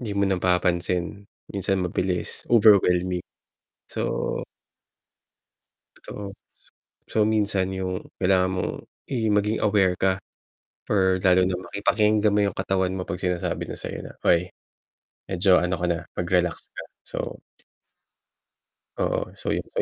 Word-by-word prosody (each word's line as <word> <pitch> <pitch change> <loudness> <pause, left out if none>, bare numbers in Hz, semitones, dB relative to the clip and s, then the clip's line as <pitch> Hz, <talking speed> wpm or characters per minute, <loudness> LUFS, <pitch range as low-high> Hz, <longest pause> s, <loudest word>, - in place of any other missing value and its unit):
'di 115 -4 -4
mo 100 - +3
napapansin, 90 -1 +1 0.5
minsan 95 -1 0
mabilis, 90 0 -3
overwhelming. 95 -5 +5 0.7
So - - -2 1.6
Totoo. 100 -1 -8 0.8
So, 110 - +2
minsan 100 -3 +1
yung 95 -1 -3 0.2
kailangan 95 -1 +3
mong 95 - -1 0.4
i 110 -5 0
maging 105 +2 +1
aware 100 -4 +3
ka 95 +1 +1 0.7
or 95 -2 +3
lalo 90 0 +5
na 95 - -1
maki 95 +3 -7
pakinggan 105 -1 +3
mo 105 - +3
yung 100 -2 -1
katawan 95 -1 0
mo 95 -1 -4
'pag 90 - -4
sinasabi 90 -2 -1
na - - -5
sa'yo - - -5
na, - - -9
"Oy, 90 +1 +3 0.8
medyo 95 0 +4
ano 90 +1 0
ka 90 - -1
na, 85 -1 0 0.2
mag-relax 90 -1 +1 0.2
ka." - - -6 0.2
So - - -5 1.6
Oo, - - -1
so - - -5
yun. - - -1
So, - - +1
95 Hz, 130 wpm, -25 LUFS, 90-100 Hz, 1.6 s, overwhelming